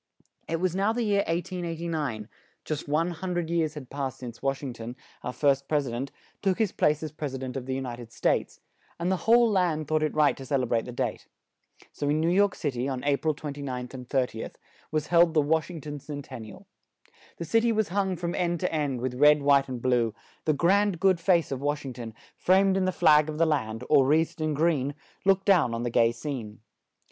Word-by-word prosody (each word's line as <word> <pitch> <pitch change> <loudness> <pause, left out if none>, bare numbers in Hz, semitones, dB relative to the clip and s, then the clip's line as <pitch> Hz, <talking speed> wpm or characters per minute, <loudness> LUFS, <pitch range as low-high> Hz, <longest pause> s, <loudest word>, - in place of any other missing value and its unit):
It 165 0 -1
was 185 0 0
now 200 +3 +2
the 240 0 -1
year 200 -2 +2
1889; 165 - -3 0.4
just 150 -2 -4
one 160 +4 +1
hun 180 +1 -4
dred 170 -1 -2
years 160 -2 0
had 135 -4 -9
passed 140 -2 -3
since 120 -2 -9
Wash 135 +1 -1
ing 130 -3 -4
ton, 120 +1 -7 0.3
our 125 - -3
first 140 0 +1
pres 150 -2 +1
i - - -4
dent, 130 +4 -4 0.3
took 190 -2 +1
his 220 -5 +1
place 150 +1 +1
as 155 - -4
Pres 150 -3 -5
i - - -3
dent 130 0 -6
of 130 -1 -5
the 130 - -1
U 135 - -2
nit 120 -2 -6
ed 115 -2 -10
States; - - -1 0.4
and 175 +2 0
the 190 - -2
whole 235 0 +7
land 175 -7 +1
thought 155 0 +1
it 155 - -1
right 150 -1 +4
to 135 - -8
cel 135 0 0
e - - +1
brate 115 -1 0
the 125 - -6
date. 120 - -3 0.6
So 145 - -3
in 150 +1 +2
New 165 +2 +2
York 200 +1 +3
Cit 145 -5 -3
y, 125 +2 -1
on 130 -2 -3
A 145 0 +3
pril 155 0 0
29th 140 -4 -5
and 125 -2 -9
30th, 125 -5 -2 0.3
was 155 -1 -1
held 170 -1 +5
the 155 - +5
"Wash 155 +3 +1
ing 165 -3 -7
ton 145 0 -6
Cen 145 0 -7
ten 130 -3 -9
ni 110 -1 -9
al." - - -15 0.7
The 170 - -5
cit 225 +8 +2
y 235 - +3
was 220 -2 0
hung 190 0 0
from 170 0 -3
end 175 -2 0
to 180 - -1
end, 145 -5 -1
with 130 0 -2
red, 150 0 +6
white 140 -1 +4
and 125 -2 -4
blue; 120 -3 +1 0.3
the 155 - +3
grand, 190 +4 +2
good 190 -2 +3
face 170 -3 +2
of 135 -1 -3
Wash 145 0 -1
ing 130 - -5
ton, 115 -3 -8 0.2
framed 190 +1 +3
in 190 -1 +1
the 185 - +1
flag 150 -3 +4
of 150 - -4
the 165 - +4
land, 115 -7 -1
or 140 -3 +5
wreathed 160 +2 +1
in 155 -1 0
green, 145 -3 +1 0.3
looked 195 0 +3
down 170 - +4
on 115 - -3
the 120 - -2
gay 115 0 +4
scene. 115 -4 -6
150 Hz, 240 wpm, -27 LUFS, 130-170 Hz, 0.7 s, whole